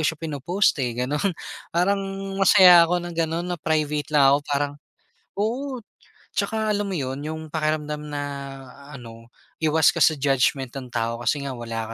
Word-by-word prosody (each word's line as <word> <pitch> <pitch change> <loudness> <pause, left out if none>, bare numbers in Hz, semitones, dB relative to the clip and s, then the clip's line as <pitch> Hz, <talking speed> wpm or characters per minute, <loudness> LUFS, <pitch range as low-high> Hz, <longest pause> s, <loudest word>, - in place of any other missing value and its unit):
siya 155 +1 0
pinopost 160 +3 0
eh 120 -2 -2
ganun. 145 +9 -1 0.4
Parang 195 +4 +1 0.4
masaya 180 -3 +8
ako 175 0 0
na 175 - -6
ganun 165 +2 -2
na 175 - -2
private 150 -2 -1
lang 140 - +6
ako 140 - +4
parang 145 0 0 0.6
oo 245 +5 -3 0.5
tsaka 220 -1 -1
alam 205 -1 -2
mo 185 - -2
yun, 135 0 -4
yung 160 +1 -5
pakiramdam 150 -1 -2
na 145 -1 -4 0.7
ano 115 -4 -11 0.3
iwas 155 -1 +3
ka - - -3
sa 155 -2 +5
judgement 135 -2 +1
ng 130 -2 -7
tao 115 0 -2
kasi 140 +3 -1
nga 135 - -4
wala 115 -2 -5
150 Hz, 160 wpm, -23 LUFS, 135-175 Hz, 0.7 s, masaya